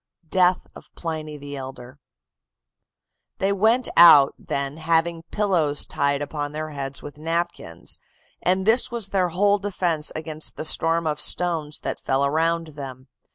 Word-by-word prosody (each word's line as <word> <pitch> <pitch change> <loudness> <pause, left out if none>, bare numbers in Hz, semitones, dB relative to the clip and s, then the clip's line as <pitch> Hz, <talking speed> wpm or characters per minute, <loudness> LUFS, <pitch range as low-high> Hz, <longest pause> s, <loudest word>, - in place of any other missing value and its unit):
DEATH 180 -1 +3
OF - - -13
PLINY 155 -2 -5
THE 145 0 -8
ELDER 130 0 -9 1.4
"They 195 +1 0
went 225 +6 +2
out, 150 -5 +8
then, 140 +1 -3
having 165 +1 0
pillows 175 -9 +1
tied 140 0 -1
upon 145 0 -5
their 155 0 -5
heads 140 -1 -5
with 145 0 -10
napkins; 165 - -4 0.4
and 185 +1 +1
this 225 +4 +5
was 235 -5 -1
their 185 -2 +1
whole 200 +4 +2
defence 180 -6 -2
against 155 -1 -4
the - - -4
storm 165 +1 +1
of 150 -1 -1
stones 165 -4 +2
that - - -4
fell 135 +1 +1
around 165 +3 0
them. 135 -3 -9
160 Hz, 145 wpm, -23 LUFS, 145-180 Hz, 1.4 s, out